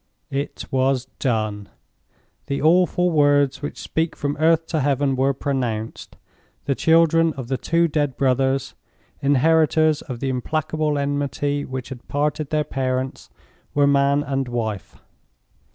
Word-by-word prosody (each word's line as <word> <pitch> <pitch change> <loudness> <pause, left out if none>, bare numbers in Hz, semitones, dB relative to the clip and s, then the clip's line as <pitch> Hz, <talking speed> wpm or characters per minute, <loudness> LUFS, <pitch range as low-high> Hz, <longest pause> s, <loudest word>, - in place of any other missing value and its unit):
It 140 +1 -4
was 130 -1 +1
done. 110 -5 -1 0.8
The 140 -1 -2
awful 180 +2 +3
words 145 -3 +3
which 145 - -5
speak 160 0 -2
from 145 0 -2
earth 165 +1 +3
to 160 - 0
Heaven 140 -1 +1
were 135 +1 +2
pronounced. 120 -6 -3 0.5
The 140 - +1
children 165 +2 +3
of 130 -4 -7
the 130 - 0
two 170 0 +2
dead 145 -4 -1
brothers—inheritors 140 +3 +1
of 125 -4 -7
the 135 +1 -2
implacable 155 +3 -1
enmity 145 0 -1
which 130 -2 -6
had 130 -2 -10
parted 150 0 -1
their 155 -1 +1
parents—were 130 +1 -3
Man 140 0 +3
and 135 -2 -2
Wife. 110 -6 -4
140 Hz, 125 wpm, -22 LUFS, 130-155 Hz, 0.8 s, awful